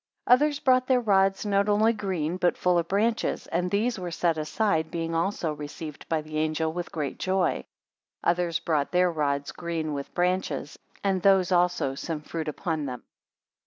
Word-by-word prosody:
11 245 - +6
Others 290 -1 -4
brought 255 -1 +5
in 255 - -28
their 255 -2 +4
rods 195 -3 +2
not 200 0 +2
only 215 +2 +4
green, 185 -6 -2
but 180 -1 +1
full 180 -1 +3
of 170 - -2
branches; 220 +5 0
and 180 +2 -1
these 215 +3 0
were 180 -1 -4
set 170 0 +1
aside, 160 +1 0
being 165 0 -3
also 165 -1 0
received 150 +1 -8
by 160 -1 +1
the 155 0 -4
angel 155 +1 0
with 175 0 -5
great 150 -4 -4
joy. 190 -1 0 0.6
Others 170 -1 +1
brought 150 -5 -1
their 180 0 +3
rods 145 -3 -1
green 165 -3 -3
with 140 -1 -5
branches, 175 -5 -1 0.2
and 190 -2 +1
those 190 -1 +4
also 175 -6 +2
some 150 +3 -4
fruit 160 +1 -5
upon 155 0 -2
them. 125 -2 -6
175 Hz, 180 wpm, -27 LUFS, 155-195 Hz, 0.6 s, 11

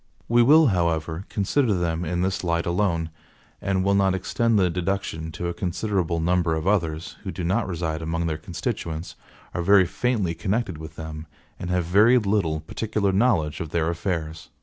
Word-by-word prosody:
We 120 +1 +4
will, 150 +4 +6
however, 85 -1 -1
consider 105 +3 +1
them 85 -1 -1
in 90 +1 -1
this 95 0 -1
light 85 -1 0
alone, 85 -3 0 0.5
and 95 -1 0
will 100 +1 +2
not 95 -1 +3
extend 115 +4 +1
the 95 -2 +4
deduction 90 -3 -2
to 90 - -3
a 85 - -2
considerable 90 -1 -1
number 85 0 +1
of 80 0 -3
others, 85 -5 0
who 100 - -6
do 90 -1 -5
not 100 +7 0
reside 80 -3 -3
among 85 +1 -2
their 80 -1 -2
constitutents, 80 +1 -4 0.4
are 85 - -1
very 95 +1 +5
faintly 105 -2 -1
connected 95 +1 -2
with 80 -1 -9
them, 80 0 -7 0.3
and 90 - -5
have 90 -1 +1
very 105 +8 +5
little 100 -8 0
particular 100 +4 -1
knowledge 95 -8 +2
of 80 - -4
their 80 +1 0
affairs. 85 -2 -4
90 Hz, 175 wpm, -24 LUFS, 80-100 Hz, 0.5 s, will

